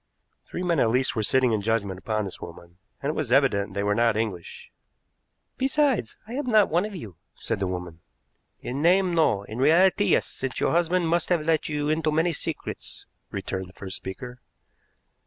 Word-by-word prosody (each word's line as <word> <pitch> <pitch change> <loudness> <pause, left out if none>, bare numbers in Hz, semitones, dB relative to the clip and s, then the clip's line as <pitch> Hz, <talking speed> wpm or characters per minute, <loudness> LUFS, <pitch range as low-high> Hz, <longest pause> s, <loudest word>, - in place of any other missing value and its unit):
Three 180 - -5
men 170 -4 +1
at 115 - +3
least 130 +3 +1
were 110 - 0
sitting 125 +3 +3
in 110 -2 +1
judgment 100 -3 -1
upon 110 +1 -2
this 95 - -8
woman, 85 +1 -11 0.2
and 140 - +1
it - - -7
was 145 -6 -2
evident 105 -8 +2
they 100 - 0
were 105 0 +2
not 115 0 +2
English. 100 -6 -4 0.9
"Besides, 265 - +1
I 230 - -7
am 280 +1 -3
not 215 -4 +5
one 175 +5 +2
of 210 -2 -7
you," 105 - -9 0.2
said 115 -3 -3
the 95 - 0
woman. 90 -2 -5 0.6
"In 135 +3 -4
name, 180 +2 +4
no; 155 -12 +2
in 110 +3 -7
reality, 185 +8 +4
yes; - - +3
since 135 -1 -4
your - - +1
husband 175 +1 +2
must 170 0 +1
have 175 -4 +2
let 160 -1 +1
you 150 -1 -1
into 155 0 +1
many 165 +3 +2
secrets," - - -5 0.2
returned 95 -1 -4
the - - -17
first 95 -1 -7
speaker. 125 +6 -8
130 Hz, 195 wpm, -25 LUFS, 105-170 Hz, 0.9 s, not